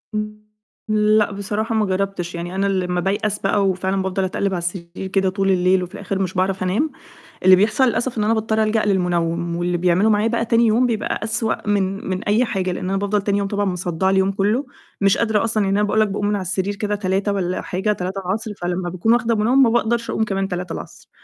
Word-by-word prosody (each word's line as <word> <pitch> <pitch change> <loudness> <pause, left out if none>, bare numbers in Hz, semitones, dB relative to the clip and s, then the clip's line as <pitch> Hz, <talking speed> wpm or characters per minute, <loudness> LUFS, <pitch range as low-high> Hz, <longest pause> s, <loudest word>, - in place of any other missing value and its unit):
إمم، 210 0 -3 0.5
لأ 215 0 +3
بصراحة 210 +3 -2
ما 215 -1 +2
جرَّبتش، 190 -2 -2
يعني 175 +2 -5
أنا 195 +1 0
لمّا 180 -2 0
بايأس 205 +2 -1
بقى 195 0 +1
وفعلًا 190 +1 0
بافضَل 190 0 -1
أتقلِّب 195 +1 -1
على - - 0
السرير 175 +1 -5
كده 190 0 +1
طول 195 0 0
الليل 185 0 +3
وفي 180 +1 -8
الآخر 200 -1 -4
مش 185 -2 -1
باعرف 185 0 0
أنام، 220 +13 0 0.5
اللي 185 0 +8
بيحصل 210 +7 +2
للأسف 240 0 -1
إن 210 - +1
أنا 215 +2 +2
باضطر 220 0 +1
ألجأ 215 0 +1
للمنَوّم، 170 -3 0
واللي 175 0 -1
بيعملُه 180 +5 +3
معايا 210 +1 +3
بقى 230 0 0
تاني 230 +1 +3
يوم 235 +4 +3
بيبقى 225 -3 -1
أسوأ 220 -1 -2
من 195 -1 -1
من 185 0 -2
أي 220 +4 +2
حاجة، 190 -5 -2
لأن 180 +1 -4
أنا 195 - 0
بافضَل 205 +1 0
تاني 200 0 0
يوم 200 - -1
طبعًا 205 0 -1
مصدّعة 180 0 -1
اليوم 190 0 +2
كُلّه، 210 +8 0 0.4
مش 195 -1 +4
قادرة 220 -2 +1
أصلًا 220 -2 +1
يعني 195 +1 +1
أنا 210 - +2
باقول 215 +1 +2
لك 215 - +3
باقوم 205 +1 -2
من 210 - +1
على 200 - -2
السرير 190 +2 -2
كده 210 0 -2
15:00 195 +1 0
والَّا 185 -2 -1
حاجة 190 +4 -1
15:00 195 +3 -3
فلمّا 175 0 -2
باكون 185 +6 +1
واخدة 235 -1 +1
منَوّم 240 +6 +4
ما 240 - +4
باقدَرش 235 0 0
أقوم 220 - 0
كمان 195 -2 -1
15:00 180 -1 -6
195 Hz, 220 wpm, -21 LUFS, 185-215 Hz, 0.5 s, اللي